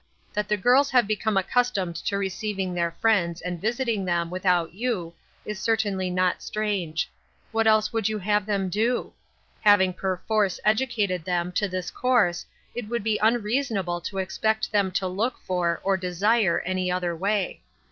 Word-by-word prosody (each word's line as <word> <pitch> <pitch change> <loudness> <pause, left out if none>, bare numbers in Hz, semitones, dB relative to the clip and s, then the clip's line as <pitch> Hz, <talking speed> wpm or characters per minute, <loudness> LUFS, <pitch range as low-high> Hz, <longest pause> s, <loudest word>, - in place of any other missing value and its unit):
" - - -36
That 210 0 -1
the 210 - +2
girls 255 +7 +4
have 250 -4 +4
become 215 0 0
accustomed 195 -4 +1
to 200 - -2
receiving 195 -1 -2
their 170 -1 0
friends, 170 -2 +1
and 175 -2 -5
visiting 230 -2 0
them, 170 -2 -1
without 180 -3 +1
you, 195 -6 -2 0.3
is 210 -2 -5
certainly 205 -5 0
not 180 0 +1
strange; 195 -7 -2 0.4
what 225 0 +2
else 215 +1 +3
would 225 -2 +1
you 215 - -2
have 210 +1 0
them 200 -2 0
do? 225 +6 0 0.5
Having 195 -3 +5
perforce 190 +1 0
educated 215 -6 +1
them 175 0 -1
to 205 +3 0
this 185 -1 -4
course 225 -9 +1 0.3
it 240 -3 -5
would 235 -2 -2
be 220 -1 +1
unreasonable 215 -5 +1
to 195 +3 -6
expect 220 +3 0
them 200 -3 +2
to 195 - 0
look 210 +7 -1
for, 175 -2 -1
or 195 -1 +2
desire, 190 +2 +2
any 185 0 -1
other 180 -1 -1
way. 195 +2 -1
200 Hz, 165 wpm, -25 LUFS, 180-220 Hz, 0.5 s, Having